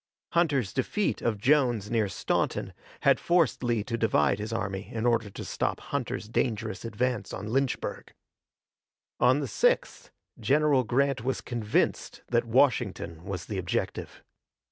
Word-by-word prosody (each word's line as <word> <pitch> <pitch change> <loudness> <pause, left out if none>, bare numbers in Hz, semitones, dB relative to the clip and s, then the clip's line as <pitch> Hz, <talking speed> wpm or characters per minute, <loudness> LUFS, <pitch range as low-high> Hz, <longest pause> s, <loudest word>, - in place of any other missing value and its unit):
Hunter's 145 - +1
defeat 195 +10 -1
of 115 -3 0
Jones 120 -3 +2
near 110 -4 +1
Staunton 95 - -1 0.3
had - - +4
forced 170 -6 +2
Lee 120 -3 +1
to 115 +1 -3
divide 100 -4 +2
his 105 +2 -4
army 100 -3 -3
in 115 0 -2
order 115 -3 +2
to - - -8
stop - - -2
Hunter's - - -4
dangerous 110 -4 -2
advance 115 +1 -2
on 105 +4 -5
Lynchburg. 135 -1 -1 1.1
On 125 +4 +4
the - - -1
6th - - 0 0.3
General 145 -1 +3
Grant 130 +1 +1
was 130 +1 -1
convinced 115 -4 -1
that 120 -1 +2
Washington 115 - +1
was 95 -3 -4
the 100 -3 -3
objective. 90 - -3
120 Hz, 140 wpm, -28 LUFS, 105-135 Hz, 1.1 s, had